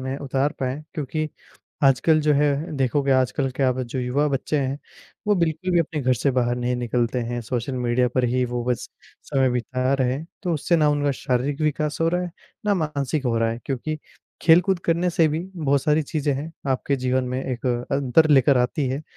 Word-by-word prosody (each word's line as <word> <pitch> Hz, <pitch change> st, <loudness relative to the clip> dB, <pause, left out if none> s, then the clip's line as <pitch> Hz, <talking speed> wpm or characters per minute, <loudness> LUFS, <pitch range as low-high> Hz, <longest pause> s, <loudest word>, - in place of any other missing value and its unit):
में 130 Hz, +1 st, -3 dB
उतार 140 Hz, +1 st, 0 dB
पाएँ। 130 Hz, +3 st, -2 dB
क्योंकि, 155 Hz, +1 st, -2 dB, 0.6 s
आजकल 155 Hz, +4 st, +4 dB
जो 150 Hz, 0 st, +3 dB
है, 145 Hz, +1 st, +3 dB, 0.3 s
देखोगे, 135 Hz, +1 st, +1 dB
आजकल 130 Hz, +1 st, +1 dB
क्या 130 Hz, -2 st, +3 dB
ब 130 Hz, +1 st, -3 dB
जो 125 Hz, +2 st, -5 dB
युवा 135 Hz, +4 st, +1 dB
बच्चे 140 Hz, +2 st, -1 dB
हैं, 135 Hz, +1 st, -1 dB, 0.5 s
वो 210 Hz, -, +4 dB
बिल्कुल 170 Hz, +1 st, 0 dB
भी 175 Hz, -, +4 dB
अपने 155 Hz, -1 st, -2 dB
घर 130 Hz, -1 st, +2 dB
से 135 Hz, +4 st, +1 dB
बाहर 120 Hz, -1 st, +1 dB
नहीं 125 Hz, 0 st, -1 dB
निकलते 120 Hz, 0 st, 0 dB
हैं, 120 Hz, +1 st, -3 dB
सोशल 120 Hz, +3 st, -3 dB
मीडिया 125 Hz, +1 st, +2 dB
पर 130 Hz, -1 st, +2 dB
ही 125 Hz, +1 st, +1 dB
वो 120 Hz, 0 st, -3 dB
बस 125 Hz, -1 st, -2 dB, 0.3 s
समय 135 Hz, -1 st, +1 dB
बिता 130 Hz, +2 st, -1 dB
रहे 130 Hz, -2 st, +1 dB
हैं। 150 Hz, +5 st, -5 dB, 0.2 s
तो 175 Hz, -3 st, 0 dB
उससे 170 Hz, +3 st, +1 dB
ना 155 Hz, -2 st, +3 dB
उनका 145 Hz, -1 st, +1 dB
शारीरिक 135 Hz, +2 st, 0 dB
विकास 150 Hz, 0 st, 0 dB
हो 165 Hz, -, +3 dB
रहा 180 Hz, +1 st, 0 dB
है, 175 Hz, -, -4 dB, 0.4 s
ना 205 Hz, -, +3 dB
मानसिक 150 Hz, -4 st, -2 dB
हो 115 Hz, -1 st, +1 dB
रहा 115 Hz, 0 st, +1 dB
है, 115 Hz, -, -4 dB
क्योंकि 150 Hz, +4 st, -3 dB, 0.4 s
खेलकूद 175 Hz, +3 st, +5 dB
करने 170 Hz, +2 st, +1 dB
से 165 Hz, -1 st, +3 dB
भी 155 Hz, +1 st, -1 dB, 0.2 s
बहुत 140 Hz, -4 st, +1 dB
सारी 155 Hz, 0 st, +2 dB
चीज़ें 150 Hz, -1 st, -1 dB
हैं, 150 Hz, +4 st, -5 dB, 0.2 s
आपके 135 Hz, +2 st, 0 dB
जीवन 130 Hz, 0 st, 0 dB
में 125 Hz, +1 st, -2 dB
एक 130 Hz, 0 st, -4 dB, 0.2 s
अंतर 140 Hz, +3 st, +3 dB
लेकर 135 Hz, -1 st, +5 dB
आती 130 Hz, +3 st, 0 dB
हैं। 135 Hz, +4 st, -3 dB
135 Hz, 205 wpm, -23 LUFS, 125-155 Hz, 0.6 s, खेलकूद